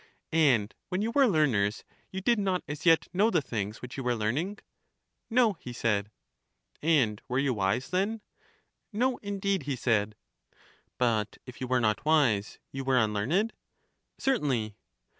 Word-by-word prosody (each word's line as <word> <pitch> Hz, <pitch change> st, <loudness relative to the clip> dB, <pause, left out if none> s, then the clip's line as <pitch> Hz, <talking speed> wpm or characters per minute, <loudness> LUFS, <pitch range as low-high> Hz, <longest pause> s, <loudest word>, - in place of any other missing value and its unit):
And 130 Hz, -10 st, +3 dB, 0.2 s
when 185 Hz, +2 st, -1 dB
you 225 Hz, -, -1 dB
were 275 Hz, +1 st, +5 dB
learners 120 Hz, -, +2 dB, 0.3 s
you 190 Hz, -, -4 dB
did 235 Hz, +2 st, +2 dB
not 190 Hz, -3 st, 0 dB
as 150 Hz, +3 st, -4 dB
yet 165 Hz, -1 st, +5 dB
know 205 Hz, +5 st, +4 dB
the 175 Hz, -, +3 dB
things 110 Hz, -6 st, -4 dB
which 125 Hz, +2 st, -7 dB
you 135 Hz, -, -3 dB
were 125 Hz, -1 st, +1 dB
learning? 140 Hz, -, -1 dB, 0.7 s
No, 235 Hz, -2 st, +4 dB
he 125 Hz, -, -8 dB
said. 105 Hz, -4 st, 0 dB, 0.7 s
And 135 Hz, -10 st, +2 dB
were 125 Hz, -, -1 dB
you 135 Hz, -1 st, +2 dB
wise 100 Hz, +4 st, 0 dB
then? 200 Hz, +4 st, 0 dB, 0.7 s
No, 245 Hz, +4 st, +1 dB
indeed, 200 Hz, -2 st, -1 dB
he 140 Hz, -, 0 dB
said. 110 Hz, -4 st, 0 dB, 0.8 s
But 110 Hz, -4 st, 0 dB
if 125 Hz, -1 st, -11 dB
you 130 Hz, -, -2 dB
were 125 Hz, 0 st, +2 dB
not 110 Hz, -3 st, +1 dB
wise 140 Hz, -10 st, +2 dB
you 135 Hz, 0 st, -4 dB
were 130 Hz, -1 st, +2 dB
unlearned? 125 Hz, -, +1 dB, 0.6 s
Certainly. 130 Hz, -, 0 dB
135 Hz, 155 wpm, -29 LUFS, -, 0.8 s, were